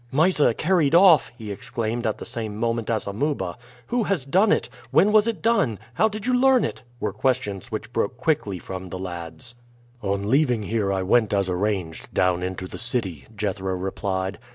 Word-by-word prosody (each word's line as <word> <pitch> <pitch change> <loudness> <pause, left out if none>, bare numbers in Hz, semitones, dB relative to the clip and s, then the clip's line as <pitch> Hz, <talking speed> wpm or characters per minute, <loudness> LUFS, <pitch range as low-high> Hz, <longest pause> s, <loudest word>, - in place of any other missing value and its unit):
"Mysa 150 -4 +3
carried 165 -3 +2
off!" 175 -3 +6
he 110 -4 -6
exclaimed 115 +3 -3
at 110 - -1
the - - -7
same 110 -3 -4
moment 115 0 -1
as 110 -2 0
Amuba. 100 - -2 0.3
"Who 240 - 0
has 185 -10 0
done 190 +9 +3
it? - - +2 0.2
when 200 - +4
was 215 +1 +5
it 210 -9 -3
done? 180 - +2 0.2
how 215 - +3
did 215 -1 -6
you 255 - +1
learn 260 0 +4
it?" - - -5 0.2
were - - -2
questions 120 -4 -1
which 110 +2 -5
broke 115 +1 -1
quickly 130 - 0
from 95 +1 -7
the 90 - -5
lads. 85 +3 -7 0.5
"On 100 0 -1
leaving 125 -3 +2
here 105 -2 0
I 95 -1 0
went 110 +2 +3
as 100 -2 +1
arranged 90 -4 -2
down 90 -1 +2
into 95 0 -4
the - - -9
city," 110 - -2
Jethro 95 -2 -2
replied. 95 0 -3
110 Hz, 185 wpm, -24 LUFS, 95-150 Hz, 0.5 s, off